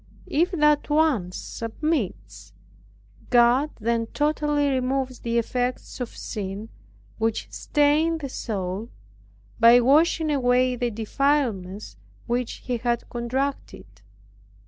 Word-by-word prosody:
If 335 +5 +1
that 300 -3 +3
once 295 - +1
submits, 185 - -4 0.8
God 245 +4 +4
then 230 +1 0
totally 295 +1 0
removes 260 0 -1
the 235 0 -1
effects 245 +3 -2
of 245 - -5
sin, 205 +1 -5 0.5
which 225 0 -1
stain 300 +3 +2
the 295 -3 -5
soul, 205 -3 -4 0.7
by 235 +1 +8
washing 310 +5 +3
away 255 -2 +2
the 245 0 -1
defilements 220 - -1 0.3
which 240 0 -3
he 250 -1 -1
has 240 0 -1
contracted. 260 +4 -3
245 Hz, 100 wpm, -24 LUFS, 225-290 Hz, 0.8 s, by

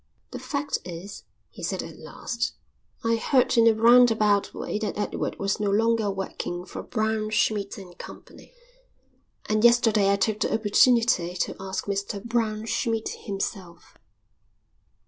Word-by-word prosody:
"The - - -6
fact 285 0 -2
is," 180 +3 -9 0.3
he - - -12
said - - -2
at - - -10
last, 235 -1 -4 0.5
"I 230 0 +2
heard 255 +2 +2
in 230 -1 +5
a 225 - +5
round 240 +2 +7
about 210 -2 +2
way 210 - -4
that 215 -2 -3
Edward 210 - -3
was 195 +1 -1
no 205 -1 0
longer 225 +1 +2
working 185 -2 -4
for - - -7
Braunschmidt 215 -2 -1
and 180 -3 -11
Co., - - -10 1.2
and 215 0 0
yesterday 225 -4 +4
I - - +4
took 210 +1 0
the - - 0
opportunity 220 -4 +3
to 180 - -2
ask 190 0 -4
Mr 200 +1 -3
Braunschmidt 225 0 -1
himself." 195 -4 -6
215 Hz, 140 wpm, -25 LUFS, 200-230 Hz, 1.2 s, round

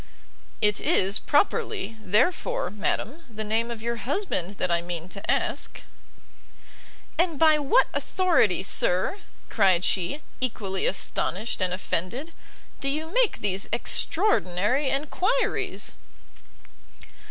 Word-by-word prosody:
"It 210 -1 +4
is, 195 +2 +2
properly, 380 - 0
therefore, 345 - +1
madam, 215 +8 -2
the 220 -1 -5
name 225 +2 0
of 230 -2 -6
your 235 0 -2
husband 235 - -2
that 185 - -1
I 170 0 +2
mean 170 -1 -5
to 200 +1 -8
ask." - - -1 1.4
"And 340 -3 +3
by 310 0 +5
what 295 - +4
authority, 335 - +2
sir," 185 - +1 0.3
cried 185 -2 +3
she, 240 - 0 0.2
equally 200 -6 -1
astonished 200 +2 -1
and 185 -1 +1
offended, 195 - -3 0.5
"do 275 - -1
you 315 +4 -4
make - - +2
these 195 -1 0
extraordinary 245 - +1
enquiries?" 365 - -1
230 Hz, 110 wpm, -26 LUFS, 190-315 Hz, 1.4 s, by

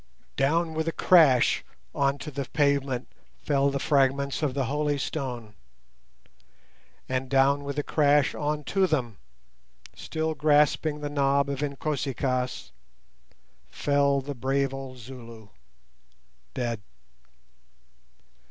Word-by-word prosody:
Down 160 +4 +1
with 160 +1 -2
a - - +1
crash 155 -9 +4 0.3
on 140 0 +1
to 150 - -7
the 140 -1 -4
pavement 140 -2 0 0.3
fell 140 -1 +1
the 140 - -2
fragments 140 0 +1
of 140 -4 -1
the 135 -2 0
holy 145 +2 0
stone, 125 -7 -4 1.5
and 130 0 -2
down 140 +1 +3
with 140 0 -5
a 145 - 0
crash 145 -2 +3
on 150 0 -2
to 190 +4 +1
them, 120 - -2 0.8
still 160 0 -3
grasping 150 0 +2
the 145 - -3
knob 140 -1 +2
of 140 0 -4
Inkosi 140 -1 -2
kaas, 125 0 -2 1.0
fell 140 - +1
the 145 +2 -5
brave 135 +1 -1
old 135 -1 -7
Zulu—dead. 110 - -10
140 Hz, 115 wpm, -26 LUFS, 130-145 Hz, 1.5 s, crash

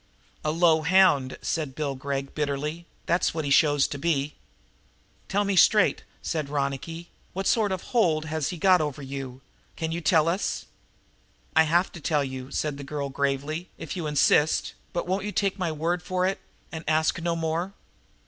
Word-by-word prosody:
"A 155 - 0
low 160 0 +4
hound," 155 -6 +4
said 150 -5 -2
Bill 145 -2 -2
Gregg 135 +1 -4
bitterly, 150 +3 -3 0.2
"that's 170 -1 +1
what 160 -2 -2
he 140 - -2
shows 145 -1 +4
to 145 - -5
be." 150 -2 0 1.0
"Tell 205 +1 +2
me 200 -1 0
straight," 210 +2 +5 0.2
said 155 -4 -2
Ronicky, 145 +4 -3 0.2
"what 195 +1 -3
sort 215 -2 +2
of 185 -1 -3
a - - -14
hold 165 -11 +2
has 155 -2 -2
he 180 - -5
got 185 0 +5
over 145 -2 -3
you? 135 -1 -6 0.3
Can 160 0 -3
you 170 +1 -3
tell 160 -1 +3
us?" 180 +4 -1 0.9
"I 160 0 +6
have 175 +4 +2
to 170 - -10
tell 150 -2 +1
you," 130 -1 -6
said 145 0 -2
the - - -6
girl 140 0 -4
gravely, 140 +5 -2
"if - - -6
you 170 -4 -3
insist, 150 +1 +3 0.2
but 175 - -2
won't 190 +2 -1
you 210 - -2
take 200 -1 0
my 175 -3 0
word 165 +3 -1
for 185 0 -1
it 190 +1 0 0.3
and 160 -1 -6
ask 160 +2 +2
no 170 0 0
more?" 165 +3 -2
160 Hz, 185 wpm, -26 LUFS, 145-175 Hz, 1.0 s, I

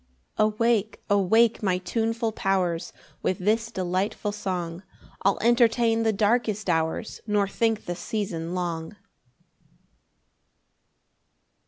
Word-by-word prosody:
7 215 - +4
Awake, 220 -1 0
awake 220 +4 +4
my 185 -3 +1
tuneful 225 +4 -1
powers; 185 -5 0 0.3
With 185 - 0
this 220 +4 +1
delightful 190 +1 -2
song 180 -4 -4 0.4
I'll 195 0 +2
entertain 235 -1 +3
the 225 -1 +2
darkest 215 -1 +1
hours, 160 +5 -1
Nor 205 -1 +2
think 225 +2 0
the 175 - -3
season 175 -3 -3
long. 170 0 -3
205 Hz, 105 wpm, -26 LUFS, 180-225 Hz, 0.4 s, 7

